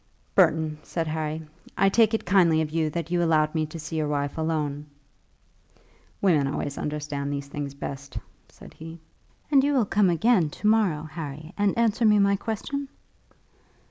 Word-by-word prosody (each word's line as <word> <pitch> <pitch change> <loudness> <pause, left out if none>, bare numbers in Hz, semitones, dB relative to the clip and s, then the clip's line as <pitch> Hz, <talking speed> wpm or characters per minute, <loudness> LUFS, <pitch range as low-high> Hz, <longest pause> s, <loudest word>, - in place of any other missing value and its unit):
"Burton," 155 -1 +3
said 165 +1 -3
Harry, 155 0 -3 0.3
"I 195 - +4
take 220 +2 +4
it - - -4
kindly 175 -4 +4
of 155 -1 -1
you 160 -1 0
that 170 +2 -4
you 175 -1 +2
allowed 155 -2 +2
me 155 -2 0
to 155 - -8
see 160 0 -5
your 155 -1 0
wife 145 -1 -2
alone." 150 -2 -2 1.4
"Women 155 -8 +3
always 140 0 -3
understand 150 -1 -3
these 140 -1 -3
things 140 -1 -5
best," 140 0 -7 0.3
said - - -15
he. 165 +1 -10 0.5
"And 275 -2 +5
you 290 +1 +2
will 245 -5 +3
come 200 -1 +2
again 175 -1 +3
to 180 - -10
morrow, 210 -8 +3
Harry, 155 0 -7
and 205 0 +1
answer 230 0 +2
me 210 -1 +5
my 200 0 +4
question?" 235 +7 -4
160 Hz, 170 wpm, -25 LUFS, 150-200 Hz, 1.4 s, And